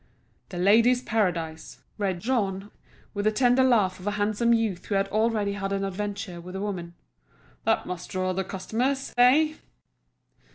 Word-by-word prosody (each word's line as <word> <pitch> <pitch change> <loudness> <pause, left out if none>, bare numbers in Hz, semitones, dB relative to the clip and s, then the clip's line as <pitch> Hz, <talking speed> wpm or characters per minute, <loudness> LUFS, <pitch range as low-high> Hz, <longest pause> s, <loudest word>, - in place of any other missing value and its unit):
"The 180 - -7
Ladies' 230 +7 +4
Paradise," 170 -8 -2 0.2
read 190 -4 -1
Jean, 205 -5 -1 0.4
with 205 -1 -3
the 215 - +4
tender 245 +3 +3
laugh 215 -8 +3
of 185 - -8
a - - +2
handsome 215 +3 +1
youth 225 -6 0
who 205 - -1
had 195 0 +1
already 215 -1 +1
had 195 -1 -4
an 195 0 -1
adventure 200 -2 -4
with 180 +2 -9
a - - -3
woman. 180 -4 -4 0.7
"That - - +2
must 180 -1 -6
draw 185 0 -1
the 190 +1 -1
customers—eh?" 250 +8 +2
205 Hz, 155 wpm, -26 LUFS, 185-230 Hz, 0.7 s, Ladies